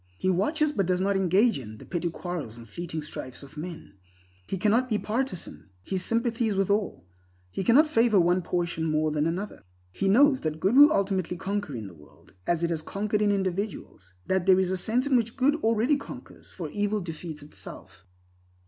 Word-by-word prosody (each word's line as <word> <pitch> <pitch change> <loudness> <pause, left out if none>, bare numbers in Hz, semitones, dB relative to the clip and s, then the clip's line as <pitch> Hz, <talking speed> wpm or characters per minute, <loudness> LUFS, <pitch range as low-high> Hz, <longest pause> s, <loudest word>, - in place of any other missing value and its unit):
He 185 - +1
watches, 300 - +1
but 195 -10 0
does 180 -1 +1
not 195 +1 +1
engage 195 - +3
in, 110 -4 -9
the - - -12
petty 175 -1 -2
quarrels 165 -9 -6
and 115 -1 -12
fleeting 160 +6 -5
strifes 130 -3 -7
of 140 +1 -13
men. 160 - -8 0.5
He 195 - -3
cannot 220 +6 +2
be 215 - +2
partisan. 215 - -3
His 185 - -2
sympathy 230 0 +1
is 210 - 0
with 195 0 +1
all. 205 - -1 0.5
He 190 - -3
cannot 255 - +6
favor 230 -8 +3
one 175 +1 +3
portion 170 -2 -2
more 155 -1 +1
than 150 +1 +1
another. 185 +5 -4 0.3
He 195 - -1
knows 270 +6 +5
that 155 0 -3
good 195 +8 +2
will 290 +2 +9
ultimately 190 - 0
conquer 200 -6 -3
in 110 -3 -5
the 95 - -10
world, 75 -3 -20
as 170 -1 +1
it 170 - +1
has 160 -2 -1
conquered 210 +5 -2
in 205 -1 +3
individuals; 190 - -3
that 190 -1 0
there 190 -1 +6
is 185 -1 +1
a - - +1
sense 225 +8 0
in 280 -2 +2
which 230 0 0
good 275 +2 +4
already 230 +2 +2
conquers, 280 - -11
for - - -6
evil 205 0 0
defeats 165 -4 -7
itself. 95 - -10
190 Hz, 200 wpm, -27 LUFS, 165-220 Hz, 0.5 s, will